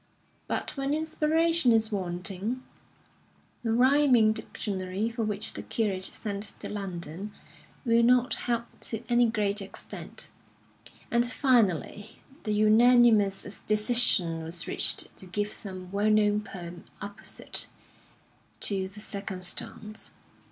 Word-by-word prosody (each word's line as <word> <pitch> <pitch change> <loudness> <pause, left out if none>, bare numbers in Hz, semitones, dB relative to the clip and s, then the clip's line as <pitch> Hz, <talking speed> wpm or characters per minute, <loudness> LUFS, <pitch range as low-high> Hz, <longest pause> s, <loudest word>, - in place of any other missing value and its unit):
But - - -3
when 275 +1 -1
inspiration 315 -2 +2
is 225 0 +3
wanting, 195 +5 -3 1.0
a 230 - -2
rhyming 250 -2 +4
dictionary, 205 -2 -3
for 230 0 -3
which 210 0 +1
the - - -5
curate 195 -4 -1
sent 205 0 -4
to - - -6
London, 195 -1 -5 0.5
will 230 -1 +4
not 250 +2 +3 0.2
help 235 -1 0
to 225 0 -3
any 240 0 +4
great 210 -2 0
extent; 195 - -8 0.8
and 235 0 +3
finally 220 - +1 0.3
the 215 - -1
unanimous 215 -2 +4
decision 210 -6 +4
was 165 +1 -2
reached - - +1
to 190 - -7
give 205 +3 -2
some 185 -2 -7
well 205 +2 +1
known 210 -1 +3
poem 175 -3 -9
apposite 200 +1 -2 0.9
to 190 -2 +4
the 205 +2 -12
circumstance. 200 +1 -4
215 Hz, 115 wpm, -28 LUFS, 195-235 Hz, 1.0 s, rhyming